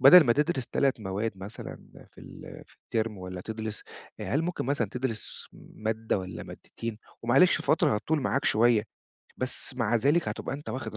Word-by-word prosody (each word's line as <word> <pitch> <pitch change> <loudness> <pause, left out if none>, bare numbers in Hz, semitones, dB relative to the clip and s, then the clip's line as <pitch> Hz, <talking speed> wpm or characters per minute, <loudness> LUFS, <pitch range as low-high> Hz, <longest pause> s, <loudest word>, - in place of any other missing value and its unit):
بَدَل 150 +6 +10
ما 120 - +5
تدرس 145 -2 0
3 135 -4 +1
مواد 105 +3 -2
مثلًا 95 +3 -7 0.4
في - - -15
ال - - -10
في - - -23
الترم 110 -3 -1
والّا 90 0 -6
تدرس 110 +1 -5 0.4
هل 145 +4 0
ممكن 175 -6 -2
مثلًا 130 -6 +1
تدرس 125 -4 -4 0.3
مادّة 110 -1 -1
والّا 90 -2 -6
مادتين؟ 115 -2 -7 0.2
ومعلش 135 +10 +5
فترة 155 - +3
هتطول 150 +8 0
معاك 140 +1 0
شوية، 115 -1 +4 0.5
بس 130 0 0
مع 120 -1 +2
ذلك 145 +9 +3
هتبقى - - -4
أنت 145 - -8
واخِد 110 -4 -4
115 Hz, 165 wpm, -28 LUFS, 110-135 Hz, 0.5 s, بَدَل